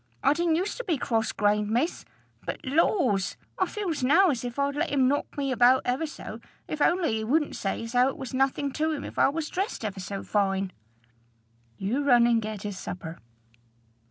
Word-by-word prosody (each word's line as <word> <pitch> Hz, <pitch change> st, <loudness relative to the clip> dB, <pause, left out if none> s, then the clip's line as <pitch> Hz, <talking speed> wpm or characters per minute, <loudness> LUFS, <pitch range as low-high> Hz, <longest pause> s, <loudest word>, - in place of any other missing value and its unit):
I 280 Hz, -, +5 dB
didn't 335 Hz, 0 st, +1 dB
use 375 Hz, +5 st, -1 dB
to -, -, -4 dB
be 350 Hz, -9 st, 0 dB
cross 225 Hz, -3 st, 0 dB
grained, 210 Hz, 0 st, +1 dB
miss. 245 Hz, +10 st, 0 dB, 0.4 s
But, -, -, -5 dB
laws! 260 Hz, -, +2 dB, 0.2 s
I 375 Hz, -, +2 dB
feels 345 Hz, -10 st, -3 dB
now 330 Hz, +7 st, +5 dB
as 250 Hz, -4 st, -3 dB
if 245 Hz, 0 st, -5 dB
I'd 280 Hz, 0 st, 0 dB
let 300 Hz, +4 st, 0 dB
him 270 Hz, -3 st, +3 dB
knock 285 Hz, +2 st, -1 dB
me 275 Hz, -2 st, -1 dB
about 250 Hz, +1 st, +5 dB
ever 260 Hz, +6 st, 0 dB
so, 300 Hz, -, -8 dB, 0.3 s
if 305 Hz, -, -4 dB
only 330 Hz, -8 st, +2 dB
he 220 Hz, -, -3 dB
wouldn't 295 Hz, +7 st, +1 dB
say 195 Hz, +3 st, -2 dB
as 230 Hz, +1 st, -7 dB
how 250 Hz, +1 st, +5 dB
it 270 Hz, -, -3 dB
was 265 Hz, -2 st, -7 dB
nothing 270 Hz, +2 st, +1 dB
to 315 Hz, +4 st, 0 dB
him 295 Hz, -, -4 dB
if -, -, -6 dB
I -, -, +5 dB
was 310 Hz, +2 st, -3 dB
dressed 385 Hz, -, -2 dB
ever 200 Hz, -2 st, -4 dB
so 195 Hz, +1 st, -5 dB
fine." 195 Hz, -2 st, 0 dB, 1.1 s
"You 235 Hz, +9 st, -1 dB
run 245 Hz, -4 st, +5 dB
and 235 Hz, -1 st, +3 dB
get 215 Hz, -2 st, -5 dB
his 205 Hz, -2 st, -5 dB
supper." 165 Hz, -2 st, -7 dB
260 Hz, 205 wpm, -27 LUFS, 220-305 Hz, 1.1 s, I